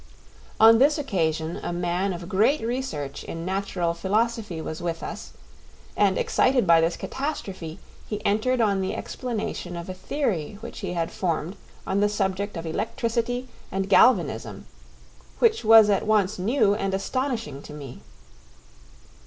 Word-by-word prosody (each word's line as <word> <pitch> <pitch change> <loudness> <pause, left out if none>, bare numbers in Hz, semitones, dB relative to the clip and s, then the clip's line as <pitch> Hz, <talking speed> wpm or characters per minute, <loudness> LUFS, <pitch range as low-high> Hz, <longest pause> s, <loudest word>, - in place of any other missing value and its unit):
On 225 +1 +8
this 290 +4 +4
occasion 165 - -1
a - - -3
man 175 +2 -1
of 175 -1 -6
great 220 +11 +2
research 225 - -4
in 165 0 -6
natural 190 -3 -1
philosophy 210 0 -1
was 160 0 -5
with 170 -1 -3
us, - - -7 0.6
and 195 -2 +3
excited 255 -4 +2
by 165 -2 +6
this 165 +1 0
catastrophe, 195 - -5 0.3
he 210 -1 -5
entered 235 +5 +2
on 200 -3 +2
the 190 - -2
explanation 230 -7 -4
of 170 +2 -7
a - - -3
theory 200 - -2
which 235 - -8
he 190 -4 -4
had 165 -2 -2
formed 170 0 -2 0.3
on 195 - 0
the 205 0 +3
subject 200 -1 -2
of 165 - -5
electricity 230 +7 -2 0.2
and 195 +1 -2
galvanism, 250 +5 +3 0.7
which 450 - +3
was 225 -1 +8
at 205 0 +1
once 210 -3 +2
new 210 +1 +3
and 195 -2 -1
astonishing 225 - -3
to - - -11
me. 140 -4 -9
195 Hz, 145 wpm, -25 LUFS, 175-230 Hz, 0.7 s, On